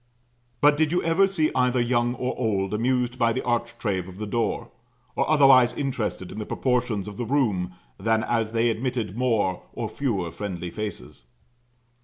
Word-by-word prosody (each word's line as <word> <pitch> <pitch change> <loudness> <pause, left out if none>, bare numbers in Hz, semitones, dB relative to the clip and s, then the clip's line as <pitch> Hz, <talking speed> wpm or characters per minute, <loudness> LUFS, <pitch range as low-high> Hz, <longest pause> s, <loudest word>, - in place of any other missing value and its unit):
But 145 0 +5
did 155 0 +2
you 180 - +1
ever 165 +4 +4
see 160 -6 +1
either 125 0 +2
young 120 0 +1
or 125 0 -2
old 100 -5 -1
amused 125 +2 0
by 115 -1 +3
the - - -2
architrave 115 -6 -1
of 95 0 -11
the 105 - -4
door? 115 +2 -2 0.4
Or - - 0
otherwise 135 -5 +6
interested 120 -10 -3
in 105 - -7
the 105 - -4
proportions 120 -6 0
of 105 -1 -8
the 120 - -2
room 105 -9 0 0.3
than 110 +2 +1
as 115 -2 0
they 115 +1 +2
admitted 115 -4 -3
more 115 -7 +1
or - - -3
fewer 100 -12 -2
friendly 90 -1 -5
faces? 105 - -6
120 Hz, 170 wpm, -25 LUFS, 105-130 Hz, 0.4 s, otherwise